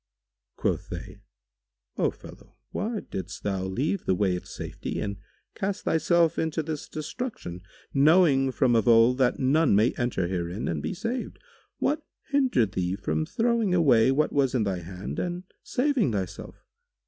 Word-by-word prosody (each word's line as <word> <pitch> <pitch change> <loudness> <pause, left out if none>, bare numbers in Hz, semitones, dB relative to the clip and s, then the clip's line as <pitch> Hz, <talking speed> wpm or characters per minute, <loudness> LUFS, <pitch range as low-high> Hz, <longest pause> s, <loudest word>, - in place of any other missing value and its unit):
Quoth - - -1
they, - - -7 0.8
"O - - +2
fellow, - - -14
why 215 +1 -2
didst 95 +1 -7
thou 95 -2 -1
leave 140 - -1
the 95 - +2
way 95 -1 +1
of 90 - -7
safety - - -5
and 100 -1 -3 0.4
cast 200 +1 -3
thyself 170 0 +2
into 160 0 -1
this 155 -1 -5
destruction, 155 - -5 0.3
knowing 140 -2 +5
from 125 -1 +2
of 115 +1 +2
old 115 +2 +6
that 125 -2 +3
none 140 -1 +3
may 110 +4 +4
enter 120 -7 0
herein 90 +2 -3
and 80 -3 -2
be - - -3
saved? 235 +6 -4 0.4
What 300 +1 0 0.3
hindered 255 - +2
thee 90 -2 -1
from 80 -5 -2
throwing 230 -5 +1
away 130 -8 +5
what 150 +3 +1
was 135 -2 +2
in 120 - +2
thy 95 -3 -1
hand 90 +3 -6
and 175 0 -3 0.2
saving 255 - +1
thyself? 95 -3 -5
130 Hz, 155 wpm, -27 LUFS, -, 0.8 s, old